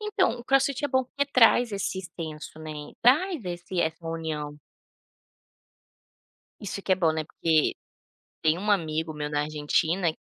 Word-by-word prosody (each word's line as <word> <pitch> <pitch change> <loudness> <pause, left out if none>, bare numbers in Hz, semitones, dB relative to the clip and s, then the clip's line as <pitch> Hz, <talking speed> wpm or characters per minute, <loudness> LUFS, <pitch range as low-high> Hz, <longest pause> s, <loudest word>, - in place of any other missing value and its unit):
Então, 405 - +1
o 240 - -10
Crossfit 270 +1 +2
é - - +1
bom 260 -1 +2
porque 280 +3 -1
traz 240 -1 +5
esse 195 -1 -2
extenso, 160 -4 -7
né, 150 -2 -7
traz 295 - +3
esse 175 0 -3
essa 165 +1 -2
união. 155 -3 -4 2.0
Isso 200 -1 -5
que 190 - +1
é - - +7
bom, 165 -4 +2
né, 155 -1 -2
porque 160 0 +1 0.7
tem 160 +2 +3
um 210 +2 -1
amigo 160 -4 0
meu 150 0 -4
na 145 0 0
Argentina, 155 +3 0
175 Hz, 150 wpm, -27 LUFS, 155-240 Hz, 2.0 s, é